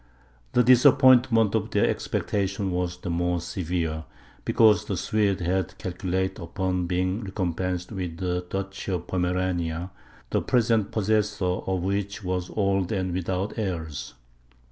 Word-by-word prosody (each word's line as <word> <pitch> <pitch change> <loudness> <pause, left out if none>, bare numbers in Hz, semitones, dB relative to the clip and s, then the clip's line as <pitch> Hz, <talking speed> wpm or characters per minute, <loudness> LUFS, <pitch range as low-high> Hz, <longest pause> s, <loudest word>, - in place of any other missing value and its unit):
The 125 - +5
disappointment 125 -3 +6
of - - 0
their - - +2
expectations 100 -1 -1
was 90 -1 -2
the 90 -1 -5
more 90 +1 0
severe, 85 -2 -3 0.4
because 105 -5 +4
the - - -2
Swedes 100 -4 +1
had 90 0 -1
calculated 95 +1 -2
upon 90 +1 -2
being 90 +4 0
recompensed 90 -1 -2
with 90 -5 -4
the 90 -1 -1
Duchy 95 0 -4
of 90 -1 -3
Pomerania, 90 -1 -1 0.4
the - - +2
present 115 -4 +2
possessor 105 -2 +1
of 90 0 -1
which 100 +1 -2
was 90 -1 -2
old 95 -3 +1
and 95 -4 -1
without 95 +4 -2
heirs. 80 - -4
95 Hz, 130 wpm, -26 LUFS, 90-100 Hz, 0.4 s, disappointment